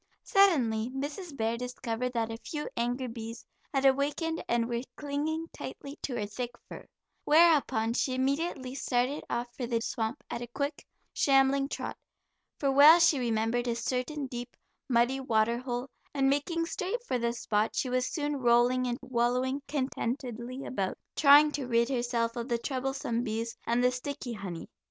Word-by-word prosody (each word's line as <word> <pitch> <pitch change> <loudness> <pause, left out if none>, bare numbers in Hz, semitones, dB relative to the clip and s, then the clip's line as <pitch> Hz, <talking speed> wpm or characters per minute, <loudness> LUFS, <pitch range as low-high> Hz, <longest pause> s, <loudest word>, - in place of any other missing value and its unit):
Suddenly 250 - +3
Mrs. 285 +4 -5
Bear 225 +1 0
discovered 250 0 -3
that 230 -1 -1
a 225 - -5
few 295 +5 -5
angry 245 +2 -1
bees 230 -1 -7 0.3
had 275 -1 +1
awakened 290 +5 +1
and 235 -1 +2
were 235 -1 -2 0.2
clinging 300 +3 -2
tightly 280 +2 -8
to 255 - -3
her 215 -3 -1
thick 240 +4 -4 0.2
fur, - - -10 0.4
whereupon 295 -8 +4
she 255 +1 0
immediately 270 0 -1
started 255 +1 0
off 240 0 -3
for 245 - -3
the 235 -1 +1
swamp 225 +3 -3
at 235 - -5
a 240 - -5
quick, 280 +4 -4 0.3
shambling 275 0 +3
trot, - - -4 0.6
for 275 -2 +2
well 290 +4 +9
she 330 -5 +4
remembered 235 0 0
a 235 - 0
certain 255 +5 -2
deep, 245 -1 -7 0.3
muddy 245 +2 +3
water 235 -2 +1
hole, 250 0 -3 0.3
and 270 -1 +3
making 330 +4 0
straight 390 +8 -3
for 255 - -1
the 235 0 0
spot, 215 -2 -1
she - - 0
was 255 0 0
soon 295 -2 -1
rolling 245 0 +3
and 240 0 -1
wallowing 255 +2 0
contentedly 255 -2 -3
about, 195 -6 -2 0.2
trying 295 +1 +7
to 285 -4 -3
rid 235 0 +2
herself 240 -3 0
of 235 +1 -4
the 235 - +2
troublesome 260 -1 -2
bees, 230 0 -3
and 235 +1 +2
the 250 - +4
sticky 255 0 -5
honey. 190 -6 -6
250 Hz, 165 wpm, -30 LUFS, 235-280 Hz, 0.6 s, well